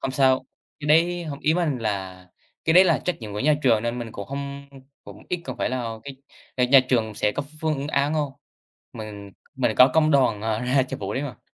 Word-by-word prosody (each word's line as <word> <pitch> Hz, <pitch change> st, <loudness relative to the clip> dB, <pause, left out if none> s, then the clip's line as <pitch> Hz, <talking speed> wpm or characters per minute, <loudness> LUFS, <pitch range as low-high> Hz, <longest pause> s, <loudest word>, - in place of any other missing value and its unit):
không 130 Hz, -, -2 dB
sao, 130 Hz, -1 st, +3 dB, 0.4 s
cái 145 Hz, -, -6 dB
đấy 170 Hz, +3 st, +3 dB
hông, 145 Hz, -3 st, -6 dB
ý 155 Hz, +2 st, +2 dB
mình 160 Hz, -8 st, 0 dB
là 95 Hz, -4 st, -4 dB, 0.4 s
cái 160 Hz, -, +3 dB
đấy 185 Hz, +3 st, +8 dB
là 170 Hz, -3 st, +3 dB
trách 180 Hz, -, -1 dB
nhiệm 105 Hz, -2 st, -7 dB
của 105 Hz, -, -4 dB
nhà 150 Hz, +1 st, +4 dB
trường 115 Hz, -4 st, +3 dB
nên 120 Hz, +1 st, -2 dB
mình 115 Hz, -2 st, -6 dB
cũng 100 Hz, -, -7 dB
hông, 140 Hz, 0 st, -6 dB, 0.4 s
cũng -, -, -12 dB
ít 180 Hz, -1 st, -2 dB
không 130 Hz, -, -6 dB
phải -, -, -1 dB
là 115 Hz, -3 st, -3 dB, 0.6 s
cái 125 Hz, -, +3 dB
nhà 135 Hz, +1 st, +7 dB
trường 110 Hz, -4 st, +1 dB
sẽ 105 Hz, +1 st, 0 dB
có 145 Hz, -, -3 dB, 0.2 s
phương 155 Hz, -3 st, -1 dB
án 145 Hz, +1 st, +1 dB
hông? 145 Hz, -3 st, -1 dB, 0.6 s
Mình 105 Hz, -3 st, -9 dB, 0.2 s
mình 130 Hz, -4 st, +1 dB
có 125 Hz, -, +8 dB
công 155 Hz, -1 st, +4 dB
đoàn, 130 Hz, -7 st, +3 dB
ờ, 110 Hz, 0 st, -1 dB
ra 130 Hz, +2 st, +2 dB
cho 130 Hz, -, -5 dB
vụ 100 Hz, +1 st, -5 dB
đấy 135 Hz, -, -1 dB
mà. 135 Hz, -7 st, -7 dB
130 Hz, 230 wpm, -24 LUFS, 110-150 Hz, 0.6 s, đấy